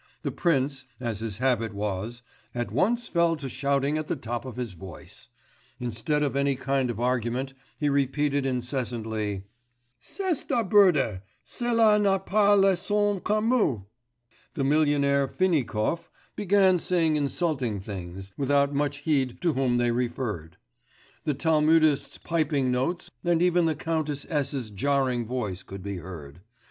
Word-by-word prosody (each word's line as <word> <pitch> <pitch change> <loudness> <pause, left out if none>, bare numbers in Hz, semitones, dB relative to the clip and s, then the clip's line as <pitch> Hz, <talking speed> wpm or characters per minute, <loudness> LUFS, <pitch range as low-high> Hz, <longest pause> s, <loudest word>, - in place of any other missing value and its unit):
The - - -1
prince, 135 -5 0
as 115 -5 -3
his 110 -3 -4
habit 115 -4 0
was, 105 +4 -3 0.3
at 120 -4 -2
once 225 - +1
fell 170 -1 +2
to 145 -3 -6
shouting 140 +3 0
at 155 - -5
the - - -1
top 120 -2 -5
of 130 - -7
his 125 -3 -4
voice; 85 -1 -11 0.5
instead 125 +6 -1
of 140 -2 -1
any 140 0 +2
kind 135 -1 0
of 115 -2 -4
argument 125 +2 -1 0.2
he 150 - 0
repeated 140 0 +1
incessantly: 120 -6 -2 0.6
'C'est 370 - -3
absurde! 190 - +3 0.2
cela 230 -3 +3
n'a 195 -2 +3
pas 205 +2 +3
le 195 -1 +5
sens 205 +1 0
commun!' 215 - +1 0.7
The 140 - -1
millionaire 140 -1 +3
Finikov 165 -2 0 0.3
began 190 -2 +3
saying 165 -3 +1
insulting 140 - -1
things, 95 -1 -7
without 140 0 +2
much 145 0 -1
heed 135 -5 +1
to 170 -3 +2
whom 130 -3 +1
they 120 0 +2
referred; 115 -9 -3 0.7
the 150 - 0
Talmudist's 155 -1 +3
piping 150 -6 0
notes 170 +8 -1
and 175 -1 +2
even 175 -1 +3
the 160 - 0
Countess 155 -2 -2
S.'s 140 -6 -2
jarring 130 +1 0
voice 105 -7 -3
could 95 -1 -9
be 100 -1 -4
heard.... 80 -3 -9
140 Hz, 140 wpm, -26 LUFS, 120-165 Hz, 0.7 s, le